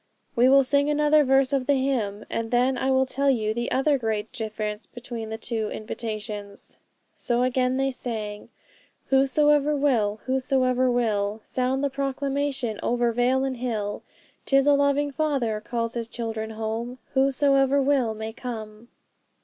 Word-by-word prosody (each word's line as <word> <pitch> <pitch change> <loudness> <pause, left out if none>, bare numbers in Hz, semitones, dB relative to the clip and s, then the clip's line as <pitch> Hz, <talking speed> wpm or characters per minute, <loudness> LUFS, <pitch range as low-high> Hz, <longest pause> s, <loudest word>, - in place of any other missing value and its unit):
'We 245 +1 +5
will 275 0 +6
sing 285 +2 +2
another 300 0 +4
verse 270 0 +3
of 265 -2 0
the 285 - +4
hymn, 235 -7 -1
and 230 0 -3
then 250 +2 +2
I 265 - -1
will 265 0 +3
tell 275 +2 0
you 220 -5 +1
the 240 +2 -2
other 275 +1 +2
great 220 -2 -2
difference 215 -2 -4
between 235 -2 -7
the 220 - -4
two 225 -2 -3
invitations.' 215 -2 -6 0.4
So 240 -1 0
again 255 0 +1
they 270 0 +1
sang 215 -5 -5 0.6
'Whosoever 295 +2 +3
will, 230 -8 +1
whosoever 255 -1 +1
will; 215 -3 0
Sound 260 +2 -1
the 280 - +1
proclamation 275 -3 -2
over 240 0 +1
vale 250 +3 +2
and 265 -2 -2
hill; 220 -4 -3 0.5
'Tis 275 0 +4
a 290 - +5
loving 285 0 +2
Father 270 -8 -1
calls 230 0 -2
His 235 -1 -4
children 225 -2 -4
home; 225 +3 -4 0.2
Whosoever 275 0 +3
will 265 -5 +1
may 220 +1 -6
come!' 220 -2 -7
250 Hz, 150 wpm, -25 LUFS, 220-275 Hz, 0.6 s, will